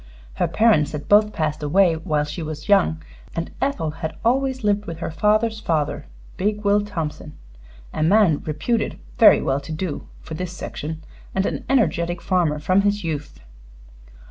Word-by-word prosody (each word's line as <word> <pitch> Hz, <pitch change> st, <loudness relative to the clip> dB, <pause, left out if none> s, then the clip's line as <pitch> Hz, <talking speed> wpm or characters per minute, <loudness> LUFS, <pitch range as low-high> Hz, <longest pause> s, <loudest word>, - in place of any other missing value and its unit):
Her -, -, +2 dB
parents 215 Hz, -11 st, +3 dB
had 145 Hz, -1 st, -5 dB
both 210 Hz, +1 st, +5 dB
passed 155 Hz, -3 st, -2 dB
away 175 Hz, +4 st, +3 dB
while 155 Hz, -2 st, -1 dB
she 150 Hz, +3 st, -5 dB
was 155 Hz, -1 st, -6 dB
young, 180 Hz, -5 st, +3 dB, 0.3 s
and 165 Hz, 0 st, -3 dB
Ethel 185 Hz, -, -1 dB
had 160 Hz, 0 st, -5 dB
always 260 Hz, +1 st, +1 dB
lived 205 Hz, 0 st, +1 dB
with 165 Hz, -1 st, -5 dB
her 165 Hz, -, -4 dB
father's 215 Hz, +6 st, +1 dB
father, 160 Hz, -8 st, -1 dB, 0.3 s
big 210 Hz, +2 st, -1 dB
Will 205 Hz, +1 st, +3 dB
Thompson, 160 Hz, -6 st, -5 dB, 0.6 s
a -, -, -3 dB
man 175 Hz, -2 st, +4 dB
reputed 160 Hz, +10 st, -1 dB, 0.2 s
very -, -, +7 dB
well 135 Hz, +1 st, +1 dB
to 140 Hz, +3 st, -9 dB
do 155 Hz, 0 st, -4 dB
for -, -, -9 dB
this 180 Hz, +2 st, -4 dB
section, 160 Hz, -2 st, -6 dB, 0.3 s
and 190 Hz, 0 st, +1 dB
an -, -, -3 dB
energetic 175 Hz, -9 st, +1 dB
farmer 170 Hz, -5 st, +1 dB
from 185 Hz, +6 st, +2 dB
his 205 Hz, 0 st, 0 dB
youth. 150 Hz, -3 st, -5 dB
170 Hz, 165 wpm, -22 LUFS, 155-205 Hz, 0.6 s, very